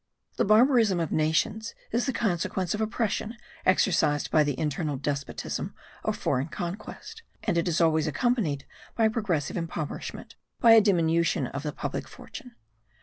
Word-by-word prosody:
The - - +2
barbarism 220 -3 +5
of 165 -3 -2
nations 160 +9 0 0.2
is 240 +4 0
the - - +2
consequence 185 -5 -1
of 210 - -2
oppression 220 0 -1 0.3
exercised 175 -5 +2
by 155 - +5
internal 150 +1 -1
despotism 140 0 -4 0.3
or - - +1
foreign 130 +3 -1
conquest; 190 - -7 0.2
and 195 - 0
it 170 0 +1
is 170 -2 +1
always 160 -1 +3
accompanied 155 - 0 0.3
by 225 -1 +3
progressive 190 - -1
impoverishment, 165 -3 -5 0.3
by 235 - +6
a 225 -1 +9
diminution 170 -7 +2
of 140 +3 -5
the 150 0 -3
public - - -4
fortune. 250 -5 -11
175 Hz, 145 wpm, -27 LUFS, 155-220 Hz, 0.3 s, a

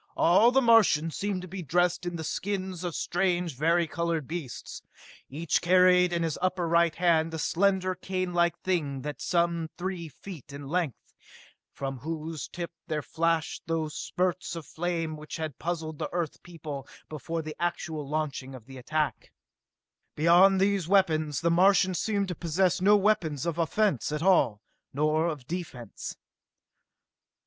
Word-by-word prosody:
All 190 +7 +6
the 265 +1 +3
Martians 200 -9 +4
seemed 195 -2 -2
to - - -7
be 190 +1 -6
dressed 175 +2 +1
in 175 - -3
the 160 - -4
skins 190 0 -3
of 175 -3 -3
strange, 175 -2 0
vari 165 +5 +2
colored 165 -3 -2
beasts. 160 -7 -6 0.5
Each 155 +3 0
carried 180 0 +5
in 170 -1 0
his 160 -3 -2
upper 180 -1 0
right 170 0 +3
hand 165 -2 +2
a - - -3
slender 185 +3 +1
canelike 180 -2 0
thing 150 -8 -1
some 170 -2 0
three 180 -2 -4
feet 155 -4 -11
in 140 0 -8
length, 165 -4 -1 0.7
from 135 -1 -5
whose 160 +2 -5
tip 170 -1 -6 0.2
there 155 -3 -2
flashed 165 -1 -1
those 160 -2 -1
spurts 180 -1 -2
of 165 -3 -7
flame 165 -2 -3
which 150 0 -8
had 155 -5 -5
puzzled 160 -2 -4
the - - -3
Earth 170 -4 -3
people 155 -5 -8 0.2
before 165 +2 -4
the 155 0 -6
actual 160 -4 -3
launching 145 -3 -3
of 120 -4 -12
the 130 0 -10
attack. 155 +4 -2 0.8
Beyond 175 +5 +5
these 195 -3 +1
weapons, 160 -7 +2
the 170 0 +2
Martians 185 +1 +4
seemed 200 -3 0
to - - -1
possess 180 +2 0
no 205 +2 +6
weapons 185 -9 +1
of 170 -1 -2
offense 170 - +1
at 150 +1 -2
all, 145 - +3 0.3
nor 155 +3 +1
of 150 -6 -4
defense. 145 - -6
170 Hz, 155 wpm, -28 LUFS, 155-180 Hz, 0.8 s, All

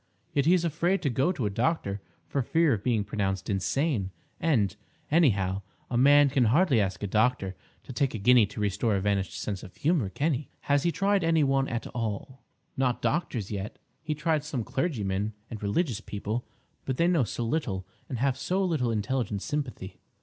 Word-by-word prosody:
Yet 140 +1 +2
he 180 - +6
is 175 -1 +1
afraid 170 +5 +1
to 140 - +1
go 135 +8 +2
to 150 -11 -2
a 105 - 0
doctor 105 -4 0 0.3
for 140 - 0
fear 160 +4 +3
of 100 -3 -3
being 115 -4 +1
pronounced 95 -1 -2
insane; 100 - 0 0.3
and, 110 - +2 0.4
anyhow, 100 - +3 0.3
a - - -1
man 145 +3 +7
can 130 -3 +3
hardly 130 - +4
ask 95 0 -2
a - - +1
doctor 105 -2 +1 0.3
to 130 - -9
take 130 0 0
a - - -1
guinea 120 +1 +5
to 105 - -9
restore 105 +1 +1
a - - +1
vanished 95 -3 -1
sense 100 -3 -3
of 95 - -12
humour, 150 - +1
can 145 - 0
he?" 135 +3 -4
"Has 145 0 +2
he 170 - +1
tried 195 +1 +1
any 165 -2 +3
one 135 -1 +2
at 115 0 -3
all—?" 115 +3 -4 0.3
"Not 130 -2 0
doctors 120 - -1
yet. 100 0 -4 0.2
He 155 0 -2
tried 155 -1 0
some 140 -6 -3
clergymen 105 - -1 0.2
and 110 - -6
religious 110 - 0
people; 105 +3 -4 0.4
but 130 -1 -2
they 170 - +3
know 170 -6 +3
so 120 +2 -3
little 115 - -1 0.2
and 125 - -3
have 130 +1 0
so 190 +2 0
little 150 -9 0
intelligent 110 -1 -1
sympathy. 130 - -4
125 Hz, 195 wpm, -28 LUFS, 105-150 Hz, 0.4 s, man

